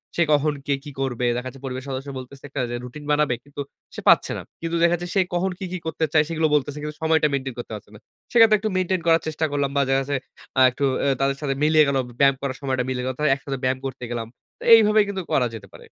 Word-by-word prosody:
সে 170 - +1
কখন 150 +1 +2
কে 140 - +2
কি 145 - -8
করবে? 125 -2 -1
দেখা 125 +1 -4
যাচ্ছে 135 +1 -14
পরিবারের 130 0 -5
সদস্য 135 +1 -4
বলতেছে 135 +2 -12
একটা 140 -1 -3
যে - - -2
রুটিন 125 +4 -9
বানাবে, 150 -3 +2
কিন্তু 145 0 -7 0.3
সে - - -6
পাচ্ছে - - +5
না। - - -5 0.2
কিন্তু 165 0 -2
দেখা 170 0 +4
যাচ্ছে 175 - -5
সে 195 - +4 0.2
কখন 185 +2 0
কী, 190 - -4
কী 185 - -2
করতে 160 0 0
চায় 155 -1 +5
সেগুলো 160 -1 +1
বলতেছে। 145 0 -1
কিন্তু 150 0 -5
সময়টা 160 -1 +3
মেইনটেইন 135 -2 -2
করতে 120 - -7
পারছে 105 - -11
না। - - -13 0.3
সেক্ষেত্রে 225 -3 +6
একটু 215 - -2
মেইনটেইন 185 -1 0
করার 165 0 +5
চেষ্টা 155 0 -1
করলাম 140 -1 0
বা 140 - +3
দেখা 135 0 +3
যাচ্ছে 140 0 -1 0.4
আ - - +6
একটু 140 - -5 0.2
অ্যা 140 - +2
তাদের 135 0 +1
সাথে 135 -2 -1
মিলিয়ে 155 0 +5
গেলো, 135 -1 +1
ব - - -12
ব্যায়াম 140 -1 +5
করার 135 -2 -3
সময়টা 130 -2 -1
মিলে 130 -1 -2
গেল। 130 - 0
তা - - -2
একসাথে 135 -1 -5
ব্যায়াম 130 0 +1
করতে 130 -1 -5
গেলাম। 115 -2 -3 0.3
তো - - -10
এইভাবেই 215 -1 +6
কিন্তু 190 -2 -3
করা 125 -2 +3
যেতে 100 -3 -10
পারে। - - -13
140 Hz, 255 wpm, -23 LUFS, 130-160 Hz, 0.4 s, সেক্ষেত্রে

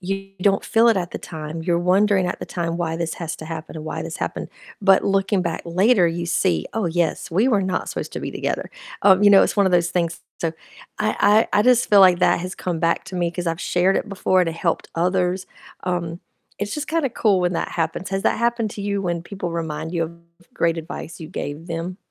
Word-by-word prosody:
you 195 +1 -4
don't 195 -1 +2
feel 230 0 +3
it 225 - +4
at 175 -1 -2
the - - -4
time, 160 0 -7
you're 170 -1 +2
wondering 190 +1 +3
at - - -3
the - - -5
time 170 -1 -3
why 165 -2 -2
this 165 -1 -2
has 165 -1 -5
to - - -9
happen 160 0 -7
and 155 - -7
why - - -4
this - - -6
happened, - - -4 0.3
but 195 -1 +5
looking 195 -1 +1
back 170 -2 -3
later, 185 +3 +3
you 170 +1 -3
see, 85 - +1
"Oh, 220 -4 0
yes, 170 -1 -1
we 215 +9 +3
were 205 -6 +2
not 185 -1 -2
supposed - - -5
to - - -4
be - - -4
together," - - -3 0.3
um, 190 0 +6
you - - +8
know, 195 - +8
it's - - 0
one 200 -1 +4
of 185 - +1
those 175 0 +3
things, 170 -2 -1 0.2
so 165 -1 -1 0.5
I 215 +2 +3
I - - +3
I - - +4
just 250 0 +4
feel 205 - +7
like 185 -2 +6
that - - +4
has 180 +1 -5
come 175 -3 -3
back 165 0 +1
to 185 - -6
me 175 -1 +1
'cause 175 0 -5
I've 165 0 -3
shared 180 +2 +2
it - - -2
before 185 -1 +1
and 175 - +2
it - - -6
helped 170 -1 -1
others, 180 +1 0 0.4
um, 175 -2 -2 0.4
it's 205 0 -3
just 300 0 -4
kinda 320 -3 +1
cool 205 -5 +2
when 175 0 0
that - - -2
happens. 165 +3 -2
Has 195 0 -1
that - - +2
happened 235 -2 0
to 200 - -6
you 200 0 -1
when 170 -2 -2
people 180 -1 -5
remind 160 -1 -4
you 165 - +1
of 165 - -7 0.4
great 165 0 +1
advice 165 +1 -7
you 160 - -6
gave 160 -1 -6
them? 170 +2 -4
180 Hz, 240 wpm, -22 LUFS, 170-195 Hz, 0.5 s, you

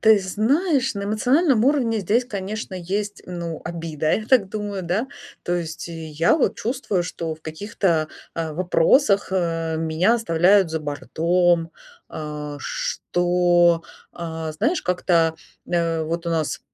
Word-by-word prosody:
ты 220 -2 +6
знаешь, 265 - +1
на 200 - -4
эмоциональном 245 - +2
уровне 255 -5 +2
здесь, 220 +6 +1
конечно, 205 -2 -5
есть, 200 +3 -3
ну, 170 -2 -5
обида, 165 -3 -2
я 215 - -3
так 230 -6 +4
думаю, 205 -2 -4
да. 190 +9 -1 0.3
То 175 - -1
есть 160 -2 -5
я 160 - 0
вот 305 - +1
чувствую, 230 -6 -1
что 165 -2 -4
в 155 - -22
каких-то, 165 -1 -1 0.3
а, 165 -2 -3
вопросах, 195 - +3
э, 165 -3 -1
меня 160 +7 +2
оставляют 190 -3 +3
за 160 - -1
бортом. 165 +3 +1 0.4
А, 150 -1 -6
что, 175 - +2 0.3
а, 160 -2 -5
знаешь, 310 - 0
как-то, 170 -3 +2 0.3
э, 165 -2 0
вот 165 +2 -3
у - - 0
нас, 160 -2 -1
175 Hz, 135 wpm, -22 LUFS, 165-215 Hz, 0.4 s, ты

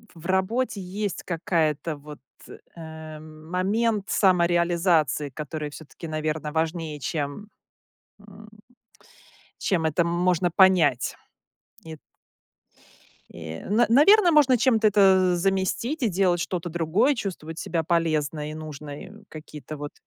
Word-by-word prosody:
в 165 0 -14
работе 200 +5 0
есть 200 +2 -4
какая-то, 165 -3 -1
вот, 150 +1 -12 0.6
э, 160 -2 -9
момент 185 +8 -2
самореализации, 170 - +2
который, 150 +2 -6
всё-таки, 160 +2 -10
наверно, 155 -1 -3
важнее, 160 -1 -2
чем, 155 +5 -4 0.7
м, 205 +1 -15 1.1
чем 170 -5 0
это 160 +2 +1
можно 175 +1 +1
понять. 170 -9 +3 0.7
Ит 160 -1 -9 1.3
Э, 80 -1 -8
н 215 +4 +2
наверно, 345 - +6
можно 280 -5 +5
чем-то 230 -2 +2
это 190 -3 +4
заместить 195 - -1
и 235 - +3
делать 180 -2 +1
что-то 175 0 -3
другое, 175 - +1
чувствовать 170 - -6
себя 165 -2 -2
полезной, 155 -2 -1
нужной, 150 +2 -9 0.2
какие-то, 155 -1 -9
вот, 145 0 -7
170 Hz, 110 wpm, -25 LUFS, 155-195 Hz, 1.3 s, наверно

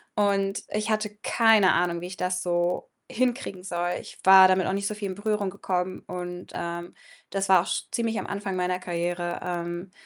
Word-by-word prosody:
und 200 -1 +1
ich 215 +1 -2
hatte 215 -1 0
keine 225 -4 +5
Ahnung, 170 -1 +1
wie 180 - -5
ich 180 - -9
das 180 0 -1
so 175 0 0 0.2
hinkriegen 240 -6 -1
soll. 175 -2 -2
Ich - - -12
war 190 0 +9
damit 185 -1 +2
auch 190 - 0
nicht 200 0 -1
so 210 - -3
viel 205 -2 -4
in - - -3
Berührung 205 0 -1
gekommen 185 -1 -2
und, 180 0 -6
ähm, 170 0 -5 0.3
das 195 +2 -2
war 185 -2 +7
auch 180 - -7
sch - - -1
ziemlich 230 -2 -1
am - - -3
Anfang 200 -1 -4
meiner 180 0 0
Karriere. 175 0 -2
Ähm, 175 +1 -4
185 Hz, 195 wpm, -26 LUFS, 175-200 Hz, 0.3 s, war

